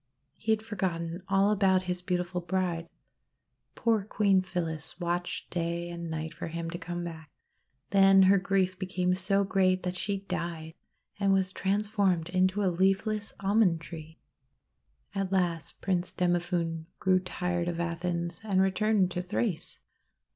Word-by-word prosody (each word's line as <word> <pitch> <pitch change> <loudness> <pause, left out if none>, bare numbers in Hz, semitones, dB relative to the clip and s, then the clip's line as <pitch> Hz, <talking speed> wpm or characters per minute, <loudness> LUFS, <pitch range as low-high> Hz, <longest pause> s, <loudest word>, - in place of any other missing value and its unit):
He 220 - -2
had 220 0 +1
forgotten 180 -5 -3
all 195 +1 +3
about 190 -2 +3
his 180 -1 -3
beautiful 180 -1 -2
bride. 175 -1 -1 0.9
Poor 225 -3 +2
Queen 200 -2 +3
Phyllis 165 -3 -3
watched 175 0 -3
day 170 0 -2
and 170 -1 -5
night 160 0 -4
for 170 - -6
him 165 0 -4
to 175 - -5
come 175 0 -4
back. 160 -3 -7 0.6
Then 195 -1 +7
her 195 +1 +6
grief 185 -1 0
became 185 -1 0
so 190 +2 +2
great 185 -1 +2
that 180 0 -2
she 200 +1 -2
died, 165 -4 -4 0.5
and 200 -1 +3
was 190 -1 +1
trans 200 +3 0
formed 190 -6 +1
into 185 +3 +2
a 185 -2 +2
leafless 195 +3 +1
Almond 195 -4 +3
Tree. 160 -1 -9 1.0
At 195 -1 -2
last 175 -4 -1
Prince 180 -2 -1
Demophoon 175 -2 0
grew 185 -1 +3
tired 180 -1 -2
of 170 -1 -2
Athens, 170 0 -2
and 200 -3 +1
returned 195 0 +2
to 180 - -2
Thrace. 180 -1 -2
180 Hz, 145 wpm, -29 LUFS, 170-195 Hz, 1.0 s, Then